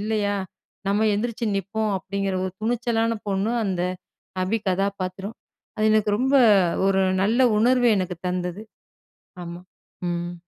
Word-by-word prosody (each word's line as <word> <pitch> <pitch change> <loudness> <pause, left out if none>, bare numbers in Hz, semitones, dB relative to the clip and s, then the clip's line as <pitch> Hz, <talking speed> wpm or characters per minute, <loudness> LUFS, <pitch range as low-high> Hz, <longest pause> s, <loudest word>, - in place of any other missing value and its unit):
இல்லயா, 210 -1 0 0.5
நம்ம 210 +2 +2
எந்திரிச்சி 230 +2 -2
நிப்போம். 210 +3 -2
அப்பிடிங்கிற 195 0 -3
ஒரு 185 - -3
துணிச்சலான 230 0 0 0.2
பொண்ணு, 200 +4 0
அந்த 185 -3 -1 0.6
அபி 220 +4 0
கதாபாத்திரம். 195 +2 -2 0.4
அது 215 - +2
எனக்கு 215 -1 +2
ரொம்ப, 265 +4 +1 0.5
ஒரு 195 0 +3 0.2
நல்ல 240 +5 +4
உணர்வு 245 +1 +4
எனக்கு 180 -2 -3
தந்தது. 180 +2 -3 0.8
ஆமா. 170 +1 -8 0.5
ம். 175 0 -3
200 Hz, 120 wpm, -24 LUFS, 185-225 Hz, 0.8 s, நல்ல